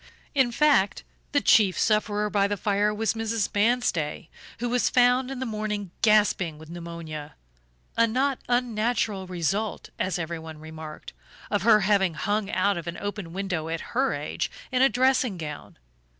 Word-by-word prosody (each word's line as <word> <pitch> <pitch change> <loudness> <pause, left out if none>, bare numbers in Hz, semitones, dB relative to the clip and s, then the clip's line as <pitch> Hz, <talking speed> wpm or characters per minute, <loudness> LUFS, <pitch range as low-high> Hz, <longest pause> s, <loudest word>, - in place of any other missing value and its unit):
In 265 -4 +3
fact, 275 -7 +3 0.3
the 285 -3 +2
chief 200 -5 +4
sufferer 210 -1 +1
by 200 -1 +3
the 205 0 -2
fire 205 +1 +1
was 215 +1 0
Mrs. 225 -2 -2
Manstey, 205 -9 0 0.3
who 240 - -2
was 245 0 +2
found 250 +1 +3
in 270 - -5
the 260 - -3
morning 210 -4 -3
gasping 205 -7 +3
with 160 +1 -12
pneumonia, 170 -3 -7 0.6
a 230 0 +4
not 260 +4 0
unnatural 230 -5 0
result, 185 +5 -2
as 185 - 0
everyone 160 -2 -6
remarked, 155 - -9 0.4
of - - +1
her 215 +1 +5
having 190 -4 +2
hung 205 +1 -1
out 195 -1 +1
of 170 - -9
an 170 - -4
open 205 -4 -5
window 180 -4 -3
at 165 0 -5
her 265 +3 +1
age - - -3 0.2
in 255 -1 +2
a 270 - +6
dressing 250 -3 +2
gown. 150 -3 -7
205 Hz, 160 wpm, -26 LUFS, 170-235 Hz, 0.6 s, a